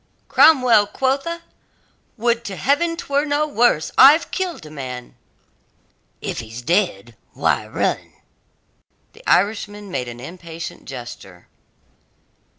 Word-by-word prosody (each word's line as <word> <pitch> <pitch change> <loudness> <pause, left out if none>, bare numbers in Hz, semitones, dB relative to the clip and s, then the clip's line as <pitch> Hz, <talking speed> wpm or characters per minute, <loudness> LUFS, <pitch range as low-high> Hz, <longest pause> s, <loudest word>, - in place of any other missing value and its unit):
"Cromwell, 250 -9 +6
quotha? 275 +8 -1 0.7
Would 235 +1 +1
to 195 - -5
Heaven 330 - +1
'twere 285 -3 0
no 300 0 0
worse! 240 - +2
I've 295 +5 +7
killed 360 - -3
a 155 - -11
man!" 125 -4 -7 1.1
"If - - -4
he's 115 +2 -8
dead, 120 - 0 0.2
why - - 0
run?" - - -2 1.0
The - - -17
Irishman 205 0 0
made 125 -5 -3
an 120 0 -8
impatient 165 +3 -8
gesture. 120 -8 -10
205 Hz, 110 wpm, -21 LUFS, -, 1.1 s, I've